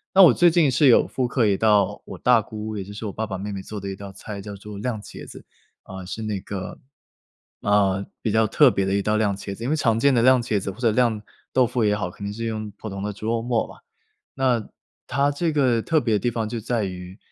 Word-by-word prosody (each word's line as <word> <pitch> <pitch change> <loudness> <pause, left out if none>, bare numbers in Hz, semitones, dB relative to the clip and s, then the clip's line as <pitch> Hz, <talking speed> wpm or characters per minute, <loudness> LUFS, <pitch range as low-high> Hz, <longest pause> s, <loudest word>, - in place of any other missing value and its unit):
那 195 - +9
我 155 - +8
最 175 +5 +5
近 165 -3 +3
是 135 +4 +4
有 125 - +5
复 125 -2 -1
刻 120 -2 +1
一 100 -2 +3
道 105 -3 +2
我 - - -8
大 120 -3 +4
姑 110 +1 -6
也 100 - -4
就 100 - -11
是 105 +2 -7
我 100 - -4
爸 110 0 -3
爸 95 - -4
妹 100 +2 -5
妹 100 -1 -5
做 105 +2 -7
的 100 - -7
一 95 - -4
道 100 0 -9
菜 100 +1 -8
叫 100 0 -8
做 100 +1 -9
酿茄子， 110 -2 -7 0.4
啊， 95 0 -9
是 110 +4 -6
那 105 -2 -2
个 95 -2 -6 0.8
呃， 100 -1 +2 0.2
比 110 - -1
较 110 0 +3
特 140 +6 +5
别 100 -5 0
的 95 - -1
一 100 - +1
道 105 +2 +1
酿茄子， 100 0 -2
因 125 - -2
为 - - +3
常 115 -7 +1
见 140 +2 +4
的 120 - +3
酿茄子 120 -6 +2
或 95 - -8
者 120 -3 +2
酿豆腐 120 +1 0
也 105 -1 +3
好， 90 -3 -3
肯 100 - -11
定 100 - -3
是 115 +2 -5
用 110 -1 -3
普 - - -8
通 100 -2 -5
的 105 +1 -2
猪 105 - -9
肉 115 0 0
末 120 -1 0
吧。 - - -13 0.6
那 125 -5 0 0.4
她 140 +1 +1
这 160 +3 -1
个 130 -6 +2
特 160 +5 +2
别 115 -3 0
的 - - +1
地 120 - 0
方 110 -1 -2
就 115 +1 -4
在 115 0 -1
于， 90 0 -7
110 Hz, 290 characters per minute, -23 LUFS, 100-120 Hz, 0.8 s, 那